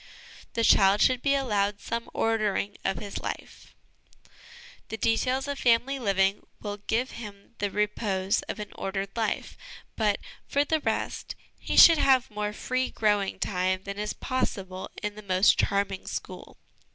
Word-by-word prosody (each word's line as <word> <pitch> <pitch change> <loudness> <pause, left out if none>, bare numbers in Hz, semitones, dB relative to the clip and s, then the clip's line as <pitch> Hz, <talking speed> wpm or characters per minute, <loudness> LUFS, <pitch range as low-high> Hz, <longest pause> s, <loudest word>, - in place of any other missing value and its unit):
The 230 - 0
Child 195 -1 +5
should 255 -1 +3
be 280 +1 +2
allowed 205 -6 0
some 230 +2 -4
Ordering 215 -2 0
of 195 -2 0
his 200 +3 -5
Life. - - -7 1.1
The 220 - -4
details 255 +5 +1
of 285 -1 -3
family 250 +3 +2
living 195 -3 +1 0.2
will 205 -1 -5
give 230 +5 -1
him 205 -1 -10
the 205 - 0
repose 205 -1 0
of - - -4
an 210 - -6
ordered 195 0 -4
life; 225 -2 -2 0.4
but, 210 -2 +1 0.3
for 285 +1 +2
the 315 +1 +1
rest, - - -3 0.2
he - - -3
should 330 -2 +9
have 260 -4 +3
more 210 0 -2
free 255 +4 -2
growing 205 -3 +1
time 185 -1 -1
than 200 +1 -6
is 210 0 -2
possible 190 -8 -3
in 210 0 -2
the 215 - -10
most 190 -1 +3
charming 200 -1 0
school. - - -7
210 Hz, 150 wpm, -27 LUFS, 200-235 Hz, 1.1 s, should